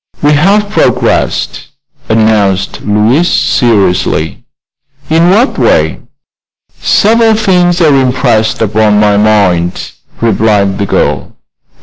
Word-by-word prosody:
"We 145 Hz, -, +3 dB
have 200 Hz, +8 st, +1 dB
progressed," -, -, -1 dB, 0.4 s
announced 110 Hz, -4 st, 0 dB
Louise, 110 Hz, +11 st, 0 dB
seriously. 95 Hz, -, 0 dB, 0.7 s
"In 165 Hz, +2 st, +3 dB
what 225 Hz, +8 st, +1 dB
way?" -, -, +1 dB, 0.8 s
"Several 225 Hz, +1 st, +2 dB
things 180 Hz, -4 st, +1 dB
are 155 Hz, -3 st, +3 dB
impressed 125 Hz, -5 st, 0 dB
upon 105 Hz, 0 st, +1 dB
my 105 Hz, -1 st, +2 dB
mind," 100 Hz, -5 st, 0 dB, 0.3 s
replied 105 Hz, -3 st, 0 dB
the 100 Hz, -, -2 dB
girl. -, -, -2 dB
110 Hz, 95 wpm, -9 LUFS, 105-170 Hz, 0.8 s, We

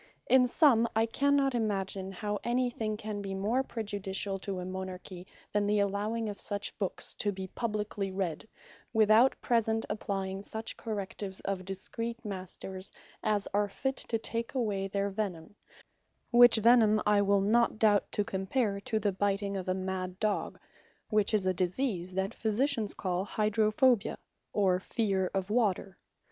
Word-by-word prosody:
In 255 Hz, -1 st, +6 dB
summe, 240 Hz, -4 st, +4 dB
I 225 Hz, +1 st, +4 dB
cannot 275 Hz, +3 st, +2 dB
imagine, 195 Hz, -4 st, -1 dB
how 205 Hz, +2 st, -3 dB
anything 240 Hz, -3 st, -1 dB
can 210 Hz, -1 st, -5 dB
be 195 Hz, -1 st, -4 dB
more 220 Hz, +7 st, +1 dB
prejudiciall 200 Hz, -4 st, -3 dB
to 195 Hz, -2 st, -3 dB
a 180 Hz, -, -5 dB
Monarchy, 185 Hz, 0 st, -6 dB, 0.2 s
than 205 Hz, 0 st, +1 dB
the 210 Hz, 0 st, +2 dB
allowing 205 Hz, +3 st, 0 dB
of 205 Hz, -1 st, -5 dB
such 205 Hz, -1 st, -2 dB
books 195 Hz, -3 st, -1 dB
to 205 Hz, -, +1 dB
be 190 Hz, -1 st, -5 dB
publikely 210 Hz, -3 st, -3 dB
read, 185 Hz, -1 st, -3 dB, 0.5 s
without 220 Hz, +3 st, +5 dB
present 225 Hz, -2 st, +1 dB
applying 195 Hz, -2 st, -3 dB
such 220 Hz, +2 st, -5 dB
correctives 200 Hz, -3 st, -5 dB
of 190 Hz, -2 st, -3 dB
discreet 230 Hz, +5 st, -5 dB
Masters, 190 Hz, -1 st, -6 dB, 0.3 s
as 210 Hz, -2 st, +1 dB
are 205 Hz, 0 st, +2 dB
fit 265 Hz, +6 st, -2 dB
to 230 Hz, -, -1 dB
take 230 Hz, +3 st, -4 dB
away 205 Hz, -6 st, 0 dB
their 200 Hz, +1 st, -1 dB
Venime; 195 Hz, -2 st, -4 dB, 0.8 s
Which 240 Hz, -1 st, +8 dB
Venime 220 Hz, -1 st, +5 dB
I 210 Hz, -1 st, +4 dB
will 200 Hz, 0 st, +3 dB
not 230 Hz, +3 st, +3 dB
doubt 210 Hz, -2 st, +3 dB
to 205 Hz, -, +3 dB
compare 200 Hz, +2 st, -1 dB
to 220 Hz, +2 st, -2 dB
the 205 Hz, -1 st, +1 dB
biting 200 Hz, +1 st, -1 dB
of 185 Hz, -1 st, -3 dB
a 185 Hz, -, +1 dB
mad 185 Hz, -1 st, -4 dB
Dogge, 210 Hz, -2 st, -1 dB, 0.5 s
which 215 Hz, -2 st, +3 dB
is 210 Hz, -4 st, +2 dB
a 185 Hz, -, +2 dB
disease 185 Hz, 0 st, -1 dB
the 190 Hz, 0 st, +1 dB
Physicians 225 Hz, 0 st, 0 dB
call 185 Hz, -1 st, -1 dB
Hydrophobia, 215 Hz, +3 st, +2 dB, 0.3 s
or 190 Hz, -3 st, +2 dB
Fear 195 Hz, -3 st, 0 dB
Of 190 Hz, +1 st, -1 dB
Water. 200 Hz, -4 st, +1 dB
205 Hz, 155 wpm, -30 LUFS, 195-225 Hz, 0.8 s, Which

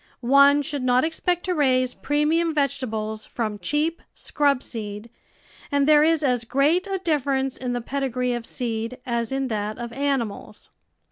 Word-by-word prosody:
One 280 Hz, +1 st, +6 dB
should 285 Hz, -1 st, -4 dB
not 255 Hz, 0 st, +3 dB
expect 345 Hz, +2 st, -1 dB
to 365 Hz, -, 0 dB
raise 255 Hz, -5 st, +2 dB
premium 310 Hz, +3 st, 0 dB
vegetables 220 Hz, -6 st, -2 dB
from 215 Hz, -3 st, -3 dB
cheap, 310 Hz, +6 st, -1 dB
scrub 280 Hz, -3 st, 0 dB
seed, 210 Hz, 0 st, -7 dB, 0.6 s
and 285 Hz, 0 st, +2 dB
there 300 Hz, -1 st, +6 dB
is 320 Hz, 0 st, +3 dB
as 250 Hz, -4 st, +1 dB
great 295 Hz, -, +1 dB
a 390 Hz, -1 st, -1 dB
difference 275 Hz, -6 st, 0 dB
in 250 Hz, -1 st, -3 dB
the 245 Hz, -, -2 dB
pedigree 250 Hz, -1 st, -2 dB
of 240 Hz, -1 st, -3 dB
seed 230 Hz, 0 st, -3 dB
as 235 Hz, -2 st, -2 dB
in 270 Hz, 0 st, -1 dB
that 210 Hz, -1 st, -3 dB
of 235 Hz, -1 st, -6 dB
animals. 270 Hz, -5 st, -3 dB
270 Hz, 155 wpm, -24 LUFS, 235-295 Hz, 0.6 s, One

